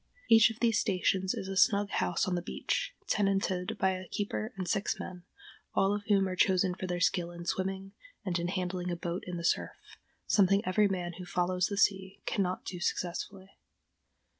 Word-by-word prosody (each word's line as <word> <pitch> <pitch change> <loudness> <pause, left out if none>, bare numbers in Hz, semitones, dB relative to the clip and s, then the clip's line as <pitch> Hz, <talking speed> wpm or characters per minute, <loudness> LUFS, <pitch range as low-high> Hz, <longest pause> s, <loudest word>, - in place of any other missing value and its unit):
Each 225 0 +8
of 225 +1 -8
these 230 -3 +3
stations 190 -1 +1
is 190 - -5
a 195 - -4
snug 200 +1 +3
house 180 - 0
on 185 - 0
the 175 - 0
beach, - - -2
tenanted 195 0 0
by 190 - +2
a 185 -1 -5
keeper 210 +2 -3
and 185 -2 -3
six 195 +5 0
men, 180 -2 -8 0.5
all 195 +1 +3
of 205 0 -3
whom 200 -2 +3
are 185 - -3
chosen 185 -1 +3
for 185 +1 -5
their 175 -1 -2
skill 180 -1 +1
in 170 0 -9
swimming, 190 +2 -2 0.3
and 180 -2 0
in 170 - -1
handling 180 -1 -2
a 175 - -1
boat 170 +1 -4
in 180 -1 -4
the 170 - -5
surf—something 195 +2 0
every 205 +3 +3
man 180 -3 -3
who 180 - -6
"follows 180 0 +1
the 200 - -4
sea" 195 -1 +1
cannot 185 -2 -1
do 180 - -5
successfully. 190 +2 -3
190 Hz, 190 wpm, -31 LUFS, 180-200 Hz, 0.5 s, Each